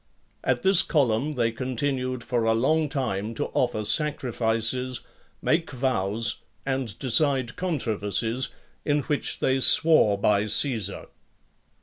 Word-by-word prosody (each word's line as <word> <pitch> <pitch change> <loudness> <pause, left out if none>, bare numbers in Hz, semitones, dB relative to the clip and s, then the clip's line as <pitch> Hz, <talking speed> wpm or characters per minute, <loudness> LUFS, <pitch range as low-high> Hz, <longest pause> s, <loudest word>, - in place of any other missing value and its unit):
At - - 0
this 190 -2 +6
column 140 0 0
they 115 -4 0
continued 130 +1 -3
for 120 -1 -1
a 115 0 +2
long 155 +6 +1
time 115 -6 -3
to - - -3
offer 115 -4 0
sacrifices, 125 -3 0 0.4
make 165 +1 +1
vows, 120 -4 0 0.3
and 130 -6 -3
decide 130 -1 +1
controversies, 115 - -1 0.4
in 145 0 +1
which 145 +1 -1
they 130 0 +1
swore 130 -7 +5
by 100 +1 +1
Caesar. 115 0 -1
125 Hz, 115 wpm, -25 LUFS, 115-140 Hz, 0.4 s, this